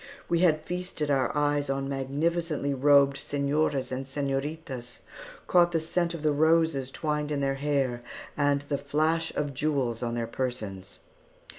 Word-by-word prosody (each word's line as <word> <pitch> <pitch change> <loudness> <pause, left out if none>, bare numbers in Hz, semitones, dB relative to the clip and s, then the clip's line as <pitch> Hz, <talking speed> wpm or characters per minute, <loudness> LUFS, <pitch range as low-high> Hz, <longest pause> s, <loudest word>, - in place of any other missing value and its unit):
We 170 - +1
had 165 -4 +4
feasted 180 -4 -3
our 135 -2 +2
eyes 145 -1 +1
on 135 0 -1
magnificently 145 +2 -1
robed 140 0 +5
señoras 145 -1 0
and 130 +1 -3
señoritas; 135 -2 -4 0.5
caught 175 -1 +4
the 165 - +3
scent 170 +1 -1
of 160 - -7
the 155 - +3
roses 160 -3 +2
twined 150 +1 -2
in 145 - 0
their 135 -1 +1
hair, 135 -5 0 0.3
and 145 -1 +2
the 145 -1 -3
flash 155 +3 0
of 145 -1 -1
jewels 130 -5 -1
on 120 -1 -2
their 120 -1 -1
persons. 110 -6 -5
145 Hz, 150 wpm, -28 LUFS, 135-155 Hz, 0.5 s, robed